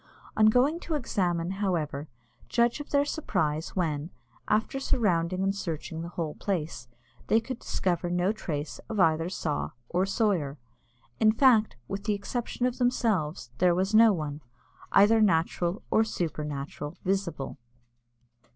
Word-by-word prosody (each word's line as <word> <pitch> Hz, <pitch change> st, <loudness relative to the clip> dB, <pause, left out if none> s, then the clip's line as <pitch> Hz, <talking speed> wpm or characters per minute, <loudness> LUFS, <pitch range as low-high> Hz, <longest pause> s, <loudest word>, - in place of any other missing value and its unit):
On 215 Hz, 0 st, +5 dB
going 260 Hz, +9 st, +3 dB
to 335 Hz, -3 st, -3 dB
examine, 180 Hz, -, -1 dB
however, 155 Hz, -7 st, -1 dB, 0.4 s
judge 235 Hz, +3 st, +2 dB
of 290 Hz, -, -7 dB
their 285 Hz, 0 st, +3 dB
surprise, 160 Hz, -, -1 dB
when, 160 Hz, -4 st, -1 dB, 0.4 s
after 220 Hz, +5 st, +1 dB
surrounding 185 Hz, -8 st, +1 dB
and 195 Hz, 0 st, +1 dB
searching 165 Hz, -4 st, -4 dB
the 170 Hz, -, -5 dB
whole 165 Hz, -3 st, -3 dB
place, 160 Hz, -10 st, -3 dB, 0.4 s
they 225 Hz, -, +4 dB
could 245 Hz, +2 st, -6 dB
discover 175 Hz, -1 st, -1 dB
no 180 Hz, +2 st, +1 dB
trace 155 Hz, -8 st, -4 dB
of 220 Hz, -2 st, -3 dB
either 165 Hz, -1 st, +3 dB
saw 160 Hz, -5 st, -3 dB, 0.2 s
or 185 Hz, +2 st, +1 dB
sawyer. 190 Hz, -, 0 dB, 0.6 s
In 215 Hz, -1 st, +6 dB
fact, 225 Hz, -2 st, +4 dB
with 195 Hz, 0 st, -5 dB
the 210 Hz, -2 st, +1 dB
exception 240 Hz, +4 st, -3 dB
of 250 Hz, 0 st, -1 dB
themselves, 185 Hz, -, 0 dB
there 180 Hz, -1 st, +4 dB
was 190 Hz, +3 st, 0 dB
no 225 Hz, 0 st, +8 dB
one, 150 Hz, -5 st, -3 dB, 0.5 s
either 215 Hz, +3 st, +6 dB
natural 175 Hz, -1 st, +1 dB
or 220 Hz, -, +5 dB
supernatural, 150 Hz, -4 st, -4 dB
visible. 185 Hz, -8 st, -2 dB
185 Hz, 140 wpm, -28 LUFS, 160-220 Hz, 0.6 s, no